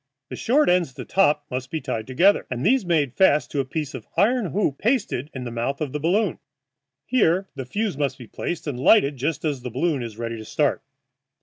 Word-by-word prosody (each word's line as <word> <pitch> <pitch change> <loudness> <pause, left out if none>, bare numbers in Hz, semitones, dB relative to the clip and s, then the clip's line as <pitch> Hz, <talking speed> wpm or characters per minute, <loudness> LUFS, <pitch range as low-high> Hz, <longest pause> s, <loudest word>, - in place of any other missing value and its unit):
The - - -5
short 290 +6 +2
ends 180 -4 +3
at 130 - -22
the - - -7
top 150 -6 +2
must 130 +1 -4
be 160 - -2
tied 125 -6 -4
together, 175 +11 +3
and 125 +2 -3
these 255 +3 +4
made 150 -7 +1
fast 190 -3 +3
to 145 - -1
a 135 - 0
piece 150 +1 -4
of 130 -5 -8
iron 220 +3 +3
hoop 175 -7 -1
pasted 210 - 0
in 130 - -6
the 120 - -5
mouth 120 +4 -2
of 150 -4 -3
the 150 - -3
balloon. 180 +4 +1 0.7
Here 195 -6 +2
the 135 -3 -6
fuse 200 - -2
must 140 -2 -1
be 125 - -10
placed 170 +9 -5
and 140 -5 -4
lighted 140 - +5
just 145 +4 -2
as 145 -4 -1
the 125 - -5
balloon 140 +3 0
is 115 -3 -7
ready 115 0 -4
to 110 - -8
start. 145 +6 0
145 Hz, 225 wpm, -23 LUFS, 130-185 Hz, 0.7 s, lighted